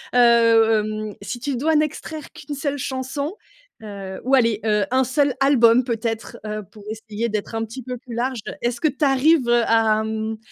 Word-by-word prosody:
Heu - - +4
heu, 230 -2 +5
mmh, 215 -1 -5
si 235 +7 -5
tu 275 +2 -2
dois 310 +6 +1
n'extraire 305 0 -2
qu'1 295 - -8
seule 285 0 -2
chanson, 265 +5 -4 0.5
heu, 195 -3 -7
ou 265 +2 +3
aller, 230 -4 +2
heu, 210 -2 +2
un 260 +1 +3
seul 280 +1 +1
album 250 -3 +5
peut-être, 230 -1 -3
heu, 215 0 -4
pour 210 - -15
essayer 220 +1 -4
d'être 215 +1 -4
un 225 - -1
petit 240 +4 -9
peu 250 +1 -5
plus 235 -1 -10
large. 250 +1 -1 0.2
Est-ce 240 0 -2
que 310 - +3
tu 290 +1 0
arrives, 270 0 +3
heu, 240 0 +4
à 220 -1 +3
mmh, 220 0 -3
235 Hz, 195 wpm, -22 LUFS, 220-265 Hz, 0.5 s, heu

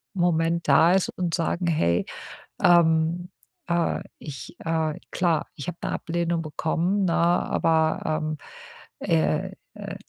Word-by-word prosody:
Moment 170 -2 +1
da 160 +5 +6
ist 190 - +2
und 175 -2 0
sagen: 175 0 -1
„Hey, 85 - +2 0.6
ähm, 170 0 +4 0.4
äh, 170 -1 0 0.2
ich, 140 +1 -8
äh, 160 -2 0 0.2
klar, 170 -4 +1
ich 140 - -7
habe 175 - -4
'ne - - -2
Ablehnung 170 0 -1
bekommen, 170 +6 0
ne, 170 - +1
aber, 165 -2 +2
ähm, 155 0 -1 0.6
äh, 80 -1 +1 0.2
äh, - - -7
165 Hz, 125 wpm, -25 LUFS, 155-175 Hz, 0.6 s, da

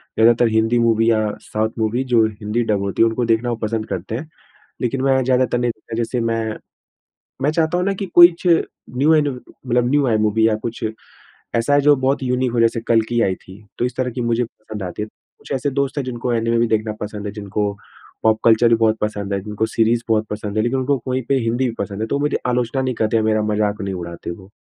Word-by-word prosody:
ज़्यादातर 115 +1 +5
हिंदी 110 +2 +2
मूवी 115 -1 +3
या 110 -1 +2 0.2
south 110 +1 -2
movie 110 +4 0
जो 115 -1 +5
हिंदी 110 +2 -2
डब 105 -3 0
होती 100 +1 -1
है - - +5
उनको 115 +2 -1
देखना 115 +1 +1
वो 120 - 0
पसंद 110 0 -2
करते 95 +3 -4
हैं। 150 +6 -6 0.5
लेकिन 130 +2 -1
मैं 135 -1 +3
ज़्यादातर 125 -1 +2
नहीं 120 0 0
देखता 110 0 -9
जैसे 120 +1 -1
मैं, 115 -1 -1 0.9
मैं 145 - +3
चाहता 160 +2 +1
हूँ 180 - 0
ना 200 - +2
कि 195 0 -4
कुछ 175 0 +7
न्यू 160 -3 +1
एन 150 -2 +3 0.4
मतलब 120 0 +2
न्यू 145 0 +3
आए 115 -3 +2
मूवी 110 +1 +2
या 110 - +1
कुछ 115 0 -4 0.7
ऐसा 115 +4 +1
आए 145 - +5
जो 145 +1 +5
बहुत 135 +1 0
यूनिक 125 0 0
हो 120 - 0
जैसे 115 0 +2
कल्कि 115 +1 +2
आयी 95 -4 +1
थी। 95 +3 -15 0.2
तो - - 0
इस 125 - -4
तरह 125 -1 -1
की 125 - -4
मुझे 120 0 +1
पसंद 110 -3 -8
आती 90 +3 -5
है, 105 - -3 0.3
कुछ - - -14
ऐसे 135 +2 0
दोस्त 140 +1 -1
हैं 140 - 0
जिनको 125 -1 -3
एनिमे 115 0 +1
भी 120 - +2
देखना 110 -1 0
पसंद 105 0 -5
है, 100 - -3
जिनको 105 0 -2 0.5
पॉप 110 0 +3
कल्चर 115 +1 +5
भी 115 - +5
बहुत 110 -1 +2
पसंद 105 -2 -2
है, 100 - 0
जिनको 105 +2 -2
सीरीज 115 +1 +1
बहुत 110 -1 +2
पसंद 105 0 -4
है 110 - +2
लेकिन 125 +3 0
उनको 135 +2 +1
कोई 130 0 -1
पे 140 - +3
हिंदी 120 +2 0
भी - - -5
पसंद 100 +1 -4
है 110 - -1
तो - - -1
वो - - 0
मुझे 145 - +1
आलोचना 125 +1 0
नहीं 130 -1 -1
करते, 110 0 +1
मेरा 110 0 +1
मज़ाक 105 0 0
नहीं 100 -1 -3
उड़ाते 85 -1 -6
वो। 95 +3 -11
115 Hz, 235 wpm, -20 LUFS, 110-125 Hz, 0.9 s, कुछ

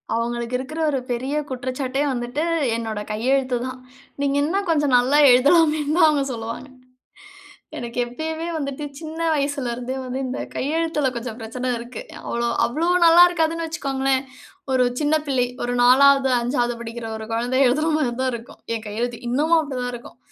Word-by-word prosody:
அவங்களுக்கு 235 +1 -2
இருக்கற 310 +5 -6
ஒரு 270 - 0
பெரிய 260 +5 -2
குற்றச்சாட்டே 260 +2 -2
வந்துட்டு 245 +5 -2 0.3
என்னொட 225 -2 -3
கையெழுத்து 255 +3 +1
தான். 255 0 -7 0.4
நீங்க 280 0 +1
இன்னும் 385 +5 -1
கொஞ்சம் 295 -4 +2
நல்லா 255 +4 +3
எழுதலாமேன்னுதான் 305 +4 +4
அவங்க 290 -2 +1
சொல்லுவாங்க. 230 +3 -6 1.1
எனக்கு 235 0 -6
எப்பயுமே 315 +6 -5
வந்துட்டு 280 0 -4 0.2
சின்ன 320 0 -8 0.2
வயசுலருந்தே 260 -3 -2
வந்து 255 +1 -4
இந்த 255 - -4 0.2
கையெழுத்தில 300 -1 0
கொஞ்சம் 235 -1 -5
பிரச்சனை 250 +3 -5
இருக்கு. 240 - -8 0.3
அவ்ளோ 235 0 -1 0.2
அவ்ளோ 315 +8 -1 0.2
நல்லா 340 +1 +8
இருக்காதுன்னு 330 -1 0
வச்சுக்கோங்களேன். 270 -4 -1 0.5
ஒரு 255 -1 +3 0.2
சின்ன 300 +1 +2
பிள்ளை 255 -3 +2 0.2
ஒரு 245 0 -1
4வது 270 +1 +6
5வது 240 0 0
படிக்கிற 230 0 -6
ஒரு 220 - -7
கொழந்தை 245 +3 0
எழுதுற 305 +6 +1
மாதிரி 270 -6 0
தான் 260 -1 +1
இருக்கும் 235 +1 -9
என் 225 -1 -4
கையெழுத்து. 235 +3 -3
இன்னமும் 310 +6 +3
அப்படி 280 -4 -5
தான் 245 0 -3
இருக்கும். 240 - -10
260 Hz, 150 wpm, -22 LUFS, 240-295 Hz, 1.1 s, நல்லா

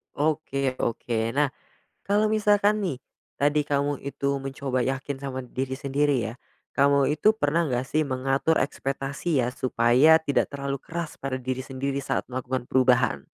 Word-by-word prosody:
Oke 145 -3 0
oke. 115 -1 -1
Nah, 145 +3 +2 0.6
kalo 205 +2 +2
misalkan 210 -1 +3
nih 165 -10 -2 0.4
tadi 145 +1 +3
kamu 145 -1 -1
itu 140 0 -4 0.2
mencoba 135 -1 -2
yakin 135 +1 -3
sama 135 -2 -4
diri 130 +1 -4
sendiri 140 0 +1
ya, 115 -1 -3 0.4
kamu 140 0 +3
itu 155 +8 +4
pernah 165 -1 +2
nggak 125 +1 -1
sih 155 +3 +1
mengatur 135 +3 +1
ekspektasi 135 +3 -2
ya 125 0 0
supaya 130 +6 +4
tidak 145 -3 0
terlalu 140 -1 -4
keras 170 -1 -5
pada 135 -1 -4
diri 130 0 -3
sendiri 135 +1 -3
saat 135 - -2
melakukan 130 0 -3
perubahan? 130 -1 +2
140 Hz, 150 wpm, -26 LUFS, 130-150 Hz, 0.6 s, itu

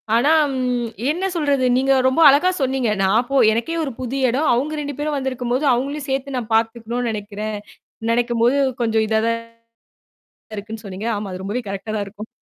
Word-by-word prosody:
ஆனா 275 +7 +3 0.3
ம் 245 -2 -1 0.2
என்ன 360 +4 -2
சொல்றது? 285 -5 +1
நீங்க 270 +1 +2 0.2
ரொம்ப 260 +6 +2
அழகா 300 +7 +4
சொன்னீங்க. 260 -3 0
நா 190 - +3 0.2
போ 275 - +1 0.2
எனக்கே 240 +9 -2
ஒரு 275 - -3
புது 255 +2 -3
இடம். 280 +6 +1
அவுங்க 300 +5 -1
2 285 -2 -5
பேரும் 295 -1 -1
வந்திருக்கும்போது, 255 +1 -2
அவங்களையும் 280 +4 -2
சேர்த்து 270 0 -2
நா - - -1
பாத்துக்கணும்ன்னு 230 +1 -1
நெனைக்கிறேன். 210 0 -5 0.5
நெனைக்கும்போது 240 +2 +2 0.2
கொஞ்சம் 220 -1 +2
இதா 220 0 +2
தான் 230 0 0 1.2
இருக்குன்னு 220 +2 -7
சொன்னீங்க. 200 +4 -5
ஆமா, 205 -2 -5
அது 185 +1 -6
ரொம்பவே 230 +5 -2
கரெக்டா 200 +2 -5
தான் 205 - -1
இருக்கும். 210 +2 -9
245 Hz, 170 wpm, -20 LUFS, 220-275 Hz, 1.2 s, அழகா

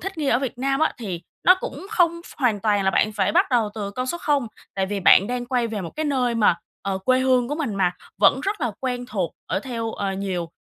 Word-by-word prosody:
thích 385 -2 -6
nghi 295 - -1
ở 245 - +4
Việt 260 -3 -4
Nam 270 +2 0
á, 315 - +3
thì 185 -7 -5 0.2
nó 365 - +8
cũng - - -6
không 340 -5 +2
ph - - -15
hoàn 235 -7 +1
toàn 205 -1 +1
là 190 - +3
bạn 215 +2 +2
phải 205 -1 0
bắt - - +4
đầu 230 -4 +2
từ 205 -2 -4
con 255 +5 -3
số 345 +6 -2
0, 285 -6 +1 0.3
tại 190 -1 0
vì 200 0 -3
bạn 190 +1 +6
đang 245 +1 -3
quay 245 -2 0
về 220 -3 -4
một 170 - -6
cái 315 - -1
nơi 255 -5 +1
mà, 210 -6 +4 0.3
ờ, 195 -1 -2
quê 255 +7 +2
hương 255 -2 +2
của 290 - -1
mình 290 -10 -2
mà, 185 -2 +2 0.3
vẫn 210 +6 +5
rất 395 +4 -2
là 245 -4 0
quen 250 -2 -2
thuộc 190 -9 -2
ở - - -1
theo, 230 -2 -4
à, 195 -1 -2
nhiều 185 -3 -3
240 Hz, 265 wpm, -23 LUFS, 200-270 Hz, 0.3 s, nó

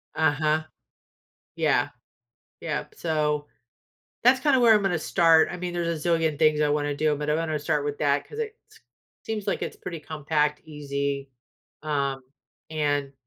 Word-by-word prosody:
Uh-huh, 155 0 +2 0.9
yeah. - - +2 0.7
Yep, - - -4
so, 150 -2 -1 0.8
that's 255 +2 +5
kinda 280 -2 +3
where 230 -2 +7
I'm 210 - +3
gonna 185 -4 +1
start, 165 -1 +4
I 175 - -5
mean, 180 0 -4
there's 170 -3 -2
a - - +2
zillion 165 -3 +1
things 155 -1 +4
I 150 - +3
wanna 145 0 0
do, 150 +1 +1
but 150 +1 -4
I'm 150 - +2
gonna 160 -2 -1
start 150 0 -1
with 145 0 -3
that 145 -1 +1
'cause 440 - -9
it 440 -1 -3
s 445 +1 -19 0.4
seems 215 -2 -4
like - - -1
it's - - -4
pretty 170 -3 -7
compact, 150 -1 -1
easy, 140 -2 -3 0.5
um, 140 -3 -1 0.5
and, 145 -3 0
155 Hz, 165 wpm, -26 LUFS, 145-170 Hz, 0.9 s, where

